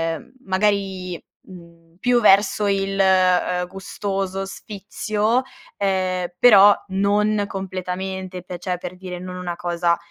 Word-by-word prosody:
ehm, 155 - -12
magari, 190 -2 -1 0.3
mhmm, 170 -2 -14 0.2
più 245 -1 +2
verso 205 0 +4
il, 195 0 -1
ehm, 185 -1 +3
gustoso 195 0 -4
sfizio, 210 +3 -2 0.4
ehm, 185 -2 0
però 205 -4 +7
non 205 +2 +1
completamente, 185 -1 -5
pe 180 -1 -8
cioè 180 0 -3
per 180 +1 -7
dire 180 -1 -7
non 180 0 -7
una 175 -1 -4
cosa 170 -1 0
190 Hz, 120 wpm, -21 LUFS, 180-200 Hz, 0.4 s, però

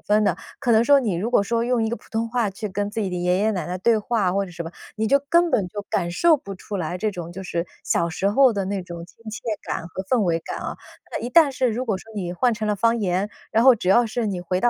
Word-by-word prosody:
分 210 0 +4
的。 - - +2 0.2
可 245 -4 +1
能 225 +1 +5
说， 285 +1 +6
你 220 -9 0
如 210 +8 -2
果 245 - +4
说 230 +3 0
用 240 -2 +1
一 - - 0
个 235 - -1
普 210 - -15
通 225 +1 -1
话 235 -3 0
去 205 +2 -5
跟 205 +2 -2
自 220 - -3
己 200 - -1
的 180 - -4
爷 180 +1 +1
爷 215 +2 +2
奶 180 -5 -2
奶 180 +1 -3
对 225 +4 +3
话， 210 -4 0
或 200 0 +1
者 185 - -10
什 170 -1 -6
么， 165 - -7 0.2
你 220 0 0
就 280 +4 +4
根 340 0 +3
本 190 -5 +2
就 205 +3 -5
感 175 -2 0
受 320 - +4
不 200 -7 -9
出 200 +2 -6
来 180 +1 -3
这 215 0 -1
种 175 -2 -6
就 190 +2 -8
是 170 -1 -2 0.2
小 170 0 +1
时 195 +4 0
候 260 +3 +5
的 200 -2 -2
那 195 -1 -2
种 170 -1 -8
亲 - - -21
切 220 - -6 0.2
感 165 - -4
和 185 +2 -6
氛 240 +6 +1
围 165 -3 +1
感 - - -6
啊。 - - -5 0.4
那 - - -2
一 245 - -3
旦 310 -3 +6
是 255 -1 +1
如 245 +4 -2
果 215 -5 0
说 225 +4 -13
你 175 -3 -3
换 240 +7 +2
成 215 -1 -3
了 210 - +1
方 230 +3 +2
言， 190 +1 0 0.2
然 225 - +4
后 260 -2 +7
只 180 - -3
要 235 +5 +6
是 225 0 -2
你 185 -3 -2
回 180 +1 -1
到 240 - +4
205 Hz, 325 characters per minute, -23 LUFS, 180-235 Hz, 0.4 s, 后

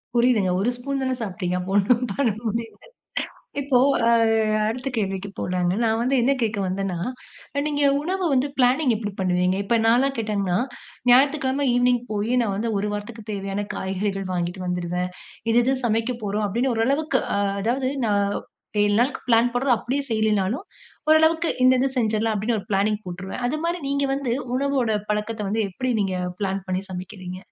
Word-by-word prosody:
புரியுதுங்க. 235 -6 +3
ஒரு 220 +5 +2
ஸ்பூன் 275 +2 -3
தானே 260 0 0
சாப்பிட்டீங்க. 180 -3 -2
அப்போ 185 +2 -5
ஒண்ணும் 235 +5 +3
பண்ண 265 +2 +1 0.2
முடியல்ல. 225 +1 -4 0.8
இப்போ, 270 -2 +2 0.3
அ - - +5 0.6
அடுத்த 250 +4 -3
கேள்விக்கு 195 -2 -2
போலாங்க. 180 0 0
நான் 225 0 +2
வந்து 255 +3 +1
என்ன 270 +3 +3
கேக்க 215 -2 0
வந்தேனா, 185 -1 -2 0.7
நீங்க 290 -1 0 0.2
உணவு 370 +4 -2
வந்து 265 +2 +2
பிளானிங் 255 +2 +4
எப்டி 210 -2 -4
பண்ணுவீங்க? 180 0 +2
இப்ப 230 +4 +2
நான்லாம் 265 +4 +3
கேட்டீங்கனா, 200 -4 0 0.5
ஞாயித்துக்கிழம 275 +1 +4
ஈவ்னிங் 245 -1 +3
போயி 210 +4 0
நான் 205 -4 -1
வந்து 225 +2 -1
ஒரு 205 +1 -1
வாரத்திற்கு 210 +1 -6
தேவையான 195 0 -3
காய்கறிகள் 195 +1 -2
வாங்கிட்டு 175 +1 -2
வந்துடுவேன். 180 0 -2 0.4
இது 225 - +2
இது 265 +2 +2
சமைக்க 225 +2 +1
போறோம் 210 +1 -1
அப்டின்னு 240 +6 0
ஓரளவுக்கு 270 +5 +1 0.2
அ - - +1 0.2
அதாவது, 255 +4 0 0.2
நான் 200 -1 +1 0.5
7 205 0 +3
நாளுக்கு 265 +3 0
பிளான் 235 +1 +4
போடறது 245 +1 +2
அப்டியே 270 +6 -2
செய்யிலனாலும், 215 - +1 0.5
ஓரளவிக்கு 320 +1 +4
இந்த 255 0 +7
இது 270 - +2
செஞ்சடலாம் 220 -1 +1
அப்டின்னு 215 +2 0
ஒரு - - -8
பிளானிங் 205 +2 +1
போட்ருவேன். 190 +6 -6
அது 305 - -2
மாரி 345 0 -1
நீங்க 280 0 +1
வந்து, 270 -4 -1 0.2
உணவோட 275 -4 +1 0.2
பழக்கத்த 210 -1 -2
வந்து 220 +1 +1
எப்டி 255 +7 -2
நீங்க 190 -2 -1 0.2
பிளான் 195 -1 -2
பண்ணி 185 0 0
சமைக்கிறீங்க. 185 0 -7
225 Hz, 160 wpm, -23 LUFS, 195-255 Hz, 0.8 s, இந்த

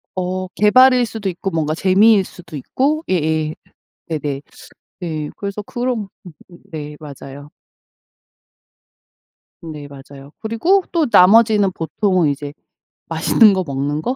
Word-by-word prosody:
어. 185 0 -3
계발일 250 +3 +5
수도 215 -3 -4
있고 185 +2 -4
뭔가 155 -1 -1
재미일 195 +4 +4
수도 170 -4 -11
있고 290 - -1
예예. 155 -3 0 0.5
네네. 145 -3 -3 0.6
네. 155 -4 -4
그래서 200 +1 -5
그런 240 -2 -3 0.2
음음. 175 +1 -15
네. 150 -2 -7
맞아요. 145 -1 -11 2.1
네. 150 -3 -8
맞아요. 140 0 -13
그리고 330 - +1
또 330 -3 +1
나머지는 205 +1 +5
보통은 175 0 0
이제 145 0 -5 0.6
맛있는 215 -4 +4
거 190 -1 -1
먹는 140 +2 -2
거? 250 +7 -2
180 Hz, 240 characters per minute, -18 LUFS, 150-215 Hz, 2.1 s, 계발일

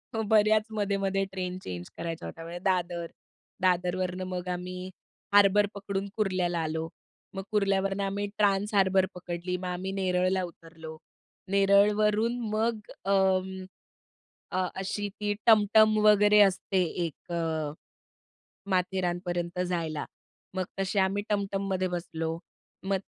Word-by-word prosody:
हो, 220 - 0
बऱ्याच 215 0 +5
मधेमधे 195 -1 0
train 185 -1 -4
change 90 -1 -6
करायच्या 165 0 -4
होता, 165 - -9
म्हणजे 170 +1 -7
दादर, 175 -3 0 0.5
दादरवरनं 180 0 +1
मग 180 0 -4
आम्ही 180 +1 -5 0.4
हार्बर 205 0 +6
पकडून 200 0 -3
कुर्ल्याला 185 -4 0
आलो. 160 +1 -2 0.5
मग 195 - -4
कुर्ल्यावरनं 195 -1 +1
आम्ही 200 +1 -2
ट्रान्स 205 0 +2
हार्बर 190 -1 +4
पकडली, 175 0 -4
मग 185 - -7
आम्ही 180 +2 -3
नेरळला 185 -1 +1
उतरलो, 165 -2 -10 0.5
नेरळवरून 210 +3 +3
मग 220 +1 0 0.3
अं, 190 -1 +1 0.9
अ, 185 0 +1
अशी 200 +2 -3
ती 205 0 0
टमटम 215 0 +6
वगैरे 210 0 +6
असते 190 0 0 0.2
एक 165 +3 -10
अ, 160 -3 -1 1.0
माथेरानपर्यंत 175 -1 -1
जायला. 165 -4 -2 0.5
मग 185 - 0 0.2
तसे 195 +1 0
आम्ही 195 +2 +1
टमटममध्ये 195 -2 -1
बसलो, 165 -2 -3 0.5
मग 195 0 +1
190 Hz, 115 wpm, -28 LUFS, 180-200 Hz, 1.0 s, हार्बर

